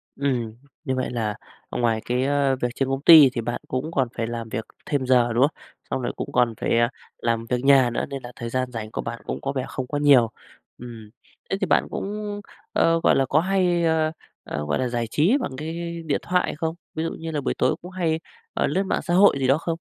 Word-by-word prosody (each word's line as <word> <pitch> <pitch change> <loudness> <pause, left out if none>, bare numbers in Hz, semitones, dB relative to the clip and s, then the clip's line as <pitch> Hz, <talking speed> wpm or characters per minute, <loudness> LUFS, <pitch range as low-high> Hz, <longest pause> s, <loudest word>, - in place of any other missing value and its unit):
Ừm, 125 -6 -1 0.3
như 130 -3 -1
vậy 130 0 -1
là 110 -4 -2 0.4
ngoài 115 -2 0
cái, 125 +1 0
ơ, 140 -1 +2
việc 125 - +2
trên 135 -1 -1
công 135 0 -1
ty 155 -3 +9
thì 120 - -2
bạn 120 +1 -3
cũng 130 +5 -3
còn 135 -5 +1
phải 115 0 -1
làm 115 -1 -5
việc 110 - -4 0.2
thêm 140 -4 -1
giờ, 120 -2 +3
đúng 120 - +2
không? 150 - -1 0.3
Xong - - -2
rồi 120 - -2
cũng - - -5
còn 120 -2 +2
phải - - +1 0.4
làm 115 -1 -1
việc 125 0 0
nhà 135 -3 +6
nữa - - -2
nên 135 -1 -6
là 120 - -8
thời 115 -1 -5
gian 130 0 -2
rảnh 110 -2 -6
của - - -3
bạn 115 - -6
cũng - - -4
có 135 - -2
vẻ 130 -2 -2
không 130 -2 -5
có 145 - -2
nhiều. 140 -6 +5 0.5
Ừm, 115 -3 -10 0.4
thế 195 - 0
thì - - +2
bạn - - +3
cũng, 205 0 -4 0.3
ơ, 165 0 +3
gọi - - +5
là 135 - +3
có 145 +4 +3
hay, 180 -1 +1
ơ, 160 -1 +2 0.3
ờ, 75 0 -4
gọi 75 - -1
là 130 - 0
giải 120 -1 -2
trí 170 - +3
bằng - - -3
cái 170 +2 -5
điện 150 - 0
thoại 180 -3 0
không? 160 +1 -2 0.2
Ví 160 - -1
dụ 165 - -2
như 165 0 -6
là 150 - -2
buổi - - -1
tối - - +2
cũng 180 - -9
hay, 165 -4 0 0.3
ờ, - - +1
lướt 195 - 0
mạng - - -1
xã 175 - -2
hội 185 -6 +5
gì 130 - +1
đó 135 +3 +4
không? 165 0 -3
135 Hz, 245 wpm, -24 LUFS, 120-160 Hz, 0.5 s, ty